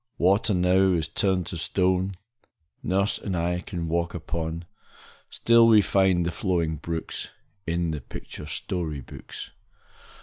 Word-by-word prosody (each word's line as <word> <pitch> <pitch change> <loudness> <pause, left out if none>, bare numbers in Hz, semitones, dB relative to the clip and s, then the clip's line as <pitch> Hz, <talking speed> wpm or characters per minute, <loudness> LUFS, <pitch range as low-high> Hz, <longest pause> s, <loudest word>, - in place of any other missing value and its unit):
Water 100 +4 +3
now 90 +1 +4
is 80 -3 0
turned 95 +2 0
to 85 - -5
stone 95 +2 +1 0.7
Nurse 100 +3 +1
and 95 -3 -3
I 90 +1 0
can 85 -2 -5
walk 85 +1 -1
upon; 85 0 -4 0.6
Still 115 0 +5
we 110 -2 +7
find 95 -3 +3
the 85 - 0
flowing 85 -7 0
brooks 80 +1 -4 0.4
In 85 0 0
the 75 -2 -4
picture 75 +3 -9
story 80 -2 -3
books. - - -9
90 Hz, 135 wpm, -26 LUFS, 85-95 Hz, 0.7 s, we